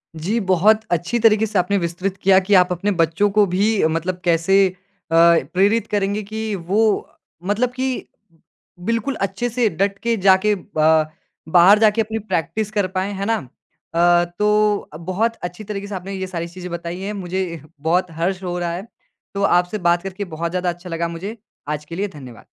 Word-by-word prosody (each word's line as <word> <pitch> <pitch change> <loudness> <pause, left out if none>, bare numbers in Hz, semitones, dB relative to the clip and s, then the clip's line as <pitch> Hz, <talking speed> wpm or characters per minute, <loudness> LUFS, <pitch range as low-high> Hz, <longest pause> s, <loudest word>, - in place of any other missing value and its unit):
जी, 185 +9 -1
बहुत 200 +2 +3
अच्छी 175 +8 0
तरीके 220 -1 +4
से 215 -2 -2
आपने 180 +3 +1
विस्तृत 180 +2 -2
किया 190 0 +5
कि 205 - +1
आप 180 0 -1
अपने 180 +4 0
बच्चों 165 +5 +2
को 210 +1 +4
भी 200 +3 +1
मतलब 165 +3 -2
कैसे 180 +3 +4 0.4
अ, - - -1 0.4
प्रेरित 205 +5 +2
करेंगे 205 0 -1
कि 220 +1 -4
वो 200 +4 +2
अ, - - -20 0.3
मतलब 230 +5 +1
कि 260 0 -3 0.8
बिल्कुल 230 +5 -1
अच्छे 195 +5 -1
से 235 -1 +1
डट 200 0 -1
के 235 0 0
जाके 195 +2 +4 0.2
ब 155 0 +4 0.4
बाहर 180 +5 +6
जाके 220 0 +4
अपनी 220 +1 -3
प्रैक्टिस 210 +1 -2
कर 205 -3 0
पाएँ। 190 +2 -3
है 195 0 -3
ना? 225 +2 +2 0.6
अ, 175 0 +4
तो 210 0 +2
बहुत 195 +7 -1
अच्छी 180 +4 -6
तरीके 200 -1 -5
से 205 - -5
आपने 190 +2 -6
ये 190 -1 -4
सारी 170 -2 -4
चीज़ें 180 +1 -9
बताई 170 +1 -5
हैं। 200 +2 -4
मुझे 180 -4 -4 0.2
बहुत 175 +3 +1
हर्ष 180 +4 -2
हो 180 -1 -3
रहा 175 -1 -2
है। 185 +6 -6 0.5
तो 200 0 -2
आपसे 180 +1 +2
बात 175 +1 +2
करके 195 +1 -5
बहुत 165 +1 -3
ज़्यादा 180 0 -1
अच्छा 175 +1 -7
लगा 170 0 -2
मुझे। 185 +7 -6 0.3
आज 150 0 -3
के 165 - -8
लिए 200 +3 -1
धन्यवाद। 130 - -12
190 Hz, 185 wpm, -20 LUFS, 175-210 Hz, 0.8 s, बाहर